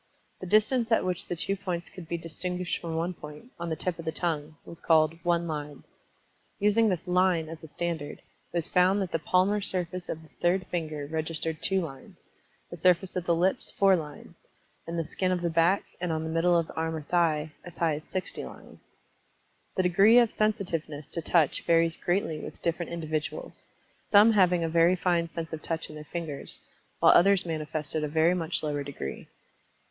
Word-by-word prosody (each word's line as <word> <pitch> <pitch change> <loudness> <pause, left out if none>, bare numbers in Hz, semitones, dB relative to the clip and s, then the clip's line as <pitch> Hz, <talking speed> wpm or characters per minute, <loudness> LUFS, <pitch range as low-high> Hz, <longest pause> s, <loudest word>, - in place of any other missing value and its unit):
The 185 - -7
distance 225 +4 +3
at 225 - +3
which 180 -2 -2
the 175 - -2
two 195 +4 0
points 180 -3 -4
could 180 -3 -11
be 170 - -2
distinguished 180 +2 -3
from 165 -1 -4
one 170 +3 -1
point, 150 +9 -11
on 170 0 -3
the 160 - -1
tip 175 +2 -2
of 165 - -7
the 160 - -1
tongue, 155 -2 -2
was 170 - -10
called 160 -1 +4
"one 170 0 +1
line." 150 -3 -5 0.7
Using 210 +2 +3
this 180 -2 -2
"line" 180 -2 +2
as 165 0 -8
a - - -8
standard, 160 -2 -4
it - - -27 0.3
was 170 -2 0
found 185 +2 +3
that 185 - -6
the 165 - 0
palmar 185 +6 +2
surface 180 -2 -3
of 160 - -5
the 160 - -17
third 185 +2 +2
finger 155 -4 -3
registered 160 +1 -3
2 190 -1 +2
lines; 135 -6 -9 0.5
the 175 - -7
surface 180 +2 +2
of 180 -1 -3
the 170 - +4
lips 180 +3 +1
4 195 -1 +6
lines, 150 -4 -7 0.5
and 170 +1 -4
the 165 - -1
skin 185 +4 -1
of 180 -1 0
the 170 - 0
back, 170 +4 +3 0.2
and 175 -1 -2
on 160 0 -1
the 160 - -4
middle 170 +2 +3
of 165 - +1
the - - -11
arm 160 0 -2
or 155 - -5
thigh, 155 -2 +1
as 175 - -11
high 165 -2 +2
as 150 +1 -5
60 185 - -4
lines - - -12 1.0
The 185 - +2
degree 195 +6 +6
of 235 -2 +5
sensitiveness 170 -9 -2
to 170 - -2
Touch 165 -2 +2
varies 165 0 +3
greatly 175 -4 -1
with - - -8
different 170 0 -1
individuals, 160 - -4 0.4
some 210 +2 +6
having 180 -5 +4
a - - +1
very 165 +2 +4
fine 175 -2 +1
sense 165 0 -6
of 155 - -5
touch 165 -1 -3
in - - -10
their 150 0 -9
fingers, 160 -5 -5 0.4
while - - +7
others 195 +1 +5
manifested 155 -1 -3
a - - 0
very 160 +3 +3
much 170 -2 -1
lower 145 -1 -1
degree. 135 - -6
170 Hz, 200 wpm, -28 LUFS, 160-180 Hz, 1.0 s, while